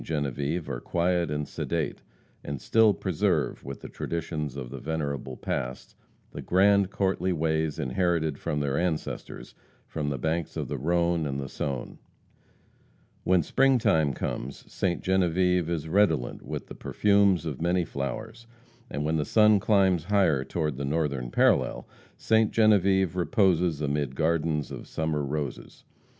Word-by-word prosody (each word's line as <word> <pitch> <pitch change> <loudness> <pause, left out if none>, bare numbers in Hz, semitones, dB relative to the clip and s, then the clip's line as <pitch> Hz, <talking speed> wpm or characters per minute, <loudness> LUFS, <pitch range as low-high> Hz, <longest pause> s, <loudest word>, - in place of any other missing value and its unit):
Genevieve 75 +2 -2
are - - -4
quiet 85 +2 0
and 75 0 -2
sedate, - - -3 0.4
and 70 -2 -5
still 110 - +4
preserve, 95 -4 -1
with 70 0 -7
the - - -7
traditions 75 -4 -4
of 65 -3 -6
the 70 - -6
venerable 70 -3 -3
past, 60 +1 -4 0.4
the - - -7
grand, 100 +1 +3
courtly 95 -2 0
ways 80 -2 0
inherited 80 +1 0
from 75 - -2
their 70 -1 0
ancestors 85 -4 -4 0.3
from 75 -2 -3
the 70 - -2
banks 80 +4 -2
of - - -3
the - - -3
Rhone 85 +1 +1
and 70 -1 -3
the 70 - -4
Saone. 65 -1 -5 1.3
When 90 -2 +3
spring 135 - +3
time 80 - +2
comes, 65 +1 -5
Ste. 90 -2 -1
Genevieve 90 -2 +2
is 80 -2 -2
redolent 80 -8 +1
with - - -6
the - - -10
perfumes 100 -5 +2
of 75 -4 -4
many 90 0 +1
flowers, 110 +11 -5 0.4
and 75 - -3
when 80 +1 +1
the 75 - +1
sun 105 +3 +5
climbs 95 -5 +2
higher 90 -9 +2
toward 75 -1 -2
the 70 - -3
northern 70 -4 -1
parallel, - - +2 0.3
Ste. 110 -1 +3
Genevieve 95 -4 +3
reposes 90 - +2
amid 70 -2 -1
gardens 80 -1 0
of - - -8
summer 80 -2 -2
roses. 70 0 -5
80 Hz, 145 wpm, -27 LUFS, 70-95 Hz, 1.3 s, sun